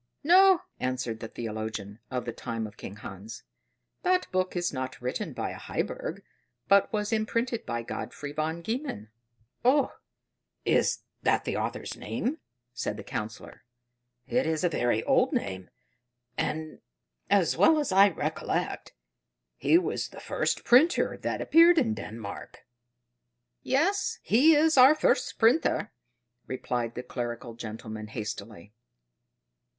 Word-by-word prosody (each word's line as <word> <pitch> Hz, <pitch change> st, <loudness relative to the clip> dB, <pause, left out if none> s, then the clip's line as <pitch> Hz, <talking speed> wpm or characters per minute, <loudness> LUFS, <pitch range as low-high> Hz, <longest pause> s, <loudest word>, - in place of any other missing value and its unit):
"No," 370 Hz, +3 st, +6 dB, 0.2 s
answered 125 Hz, -3 st, -2 dB
the 110 Hz, -, -6 dB
theologian 110 Hz, -2 st, -5 dB
of 125 Hz, -2 st, -3 dB
the 120 Hz, -, -4 dB
time 115 Hz, -2 st, -4 dB
of 105 Hz, -1 st, -10 dB
King 100 Hz, -, -8 dB
Hans: 105 Hz, +2 st, -9 dB, 0.6 s
"that 365 Hz, 0 st, +2 dB
book 185 Hz, 0 st, 0 dB
is 175 Hz, -2 st, -1 dB
not 130 Hz, -1 st, -4 dB
written 125 Hz, +1 st, -3 dB
by -, -, -3 dB
a -, -, -8 dB
Heiberg, -, -, -4 dB, 0.4 s
but 200 Hz, 0 st, +4 dB
was 210 Hz, 0 st, -1 dB
imprinted 230 Hz, +2 st, -1 dB
by 120 Hz, -1 st, -2 dB
Godfrey 145 Hz, +4 st, -6 dB
von 155 Hz, +3 st, -3 dB
Gehmen." 220 Hz, -, -4 dB, 0.5 s
"Oh, 265 Hz, +2 st, +3 dB, 0.7 s
is -, -, +2 dB, 0.2 s
that -, -, +2 dB
the -, -, -2 dB
author's -, -, -3 dB
name?" 285 Hz, +6 st, -3 dB, 0.3 s
said 120 Hz, -4 st, -3 dB
the -, -, -7 dB
Councillor. 105 Hz, +1 st, -6 dB, 0.6 s
"It 255 Hz, -, 0 dB
is 160 Hz, 0 st, 0 dB
a 175 Hz, -, +3 dB
very 120 Hz, -7 st, 0 dB
old -, -, +3 dB
name, 95 Hz, -2 st, -3 dB, 0.7 s
and, 155 Hz, 0 st, -3 dB, 0.5 s
as 195 Hz, -4 st, +3 dB
well 320 Hz, -1 st, +5 dB
as 295 Hz, -8 st, 0 dB
I 195 Hz, +2 st, +7 dB
recollect, -, -, -3 dB, 0.6 s
he 330 Hz, -, +4 dB
was 360 Hz, -, -1 dB
the -, -, -12 dB
first -, -, -1 dB
printer 285 Hz, +9 st, +4 dB
that -, -, -3 dB
appeared 335 Hz, +2 st, +6 dB
in 235 Hz, -8 st, +3 dB
Denmark." 110 Hz, -, -8 dB, 1.0 s
"Yes, 345 Hz, +10 st, +1 dB
he 300 Hz, +8 st, +5 dB
is 310 Hz, -1 st, +4 dB
our 265 Hz, +4 st, +9 dB
first -, -, +1 dB
printer," 230 Hz, -2 st, +3 dB, 0.6 s
replied 120 Hz, -2 st, -3 dB
the 125 Hz, -, -5 dB
clerical 120 Hz, -1 st, -5 dB
gentleman 110 Hz, -1 st, -7 dB
hastily. 105 Hz, -2 st, -7 dB
145 Hz, 135 wpm, -28 LUFS, -, 1.0 s, our